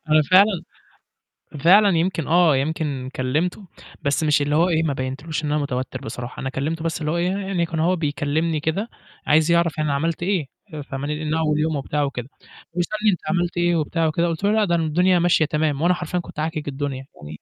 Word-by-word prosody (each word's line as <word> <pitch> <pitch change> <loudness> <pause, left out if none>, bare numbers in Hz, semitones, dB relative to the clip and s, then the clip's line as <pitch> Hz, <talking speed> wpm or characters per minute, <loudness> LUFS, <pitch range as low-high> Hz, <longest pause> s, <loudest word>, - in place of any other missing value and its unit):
أنا 155 0 +6
فعلًا 190 0 +5 1.0
فعلًا 190 +3 +5
يمكن 165 -3 -1
آه، 165 -2 +4
يمكن 140 -2 -2
كلمته 160 +9 -1 0.3
بس 140 +3 0
مش 150 -1 +3
اللي 145 +1 0
هو 170 +4 +3
إيه 160 -2 +2
ما 155 -3 0
بينتش 140 +5 -4
له - - -2
إن 150 - 0
أنا 150 - +1
متوتّر 130 -3 -4
بصراحة 120 +2 -7
أنا 135 - -3
كلمته 155 +5 -3
بس 165 -2 -2
اللي 150 - -1
هو 170 - 0
إيه، 175 +1 +1
يعني 195 -3 -1
كان 165 -1 -4
هو 175 +3 +2
بيكلّمني 155 +1 -1
كده 180 +9 -2 0.4
عايز 155 +2 +4
يعرف 170 -1 +3
أنا 155 -2 0
عملت 165 +4 -1
إيه، 185 -6 0 0.3
آآ، 150 - -5
فاهماني، 145 +3 -4
إن 155 - -1
أول 155 -2 +1
يوم 155 0 0
وبتاع 145 +1 -1
وكده 135 -3 -4 0.4
ويسألني 210 +5 +1
أنت 180 - -2
عملت 175 -2 0
إيه 175 0 +2
وبتاع 165 +1 0
وكده 170 +2 +1
قُلت 165 +2 -3
له 205 - +3
"لأ، 215 -1 +3
ده 170 -3 +1
م 165 - 0
الدنيا 180 +4 +3
ماشية 170 -2 +3
تمام." 150 -1 -1
وأنا 175 +2 +4
حرفيًا 180 0 -3
كنت 170 - -9
عاكِك 155 -1 -3
الدنيا 135 -1 -4 0.2
يعني 75 0 -9
160 Hz, 215 wpm, -22 LUFS, 145-175 Hz, 1.0 s, أنا